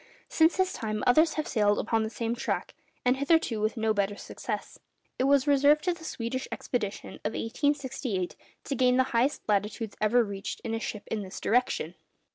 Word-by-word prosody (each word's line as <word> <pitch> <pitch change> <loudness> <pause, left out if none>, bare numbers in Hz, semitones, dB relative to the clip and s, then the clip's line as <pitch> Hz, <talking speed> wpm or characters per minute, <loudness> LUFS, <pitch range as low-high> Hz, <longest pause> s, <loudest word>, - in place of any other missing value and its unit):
Since 320 +1 +4
his 375 -1 +1
time, 215 -2 -3
others 310 +6 +5
have 310 - -2
sailed 210 -3 +2
upon 225 0 +1
the 220 - -1
same 230 0 -2
track, - - -2 0.3
and 250 +1 +3
hitherto 280 -6 +2
with 215 +3 0
no 220 -1 +2
better 205 -1 0
success. - - -6 0.4
It 255 - +3
was 280 -1 +4
reserved 290 +1 +4
to 360 - +1
the 325 -1 -12
Swedish 255 -3 -3
expedition 210 -5 -3
of 215 - -2
1868 260 - -1 0.3
to 275 - -3
gain 250 0 +3
the 260 - +5
highest 250 +5 +1
latitudes 210 +1 -1
ever 235 +3 +4
reached 200 -2 -5
in 225 - -4
a 225 - -1
ship 210 -2 -5
in 220 - -1
this 190 -1 -7
direction. 220 -8 +1
235 Hz, 185 wpm, -28 LUFS, 215-280 Hz, 0.4 s, others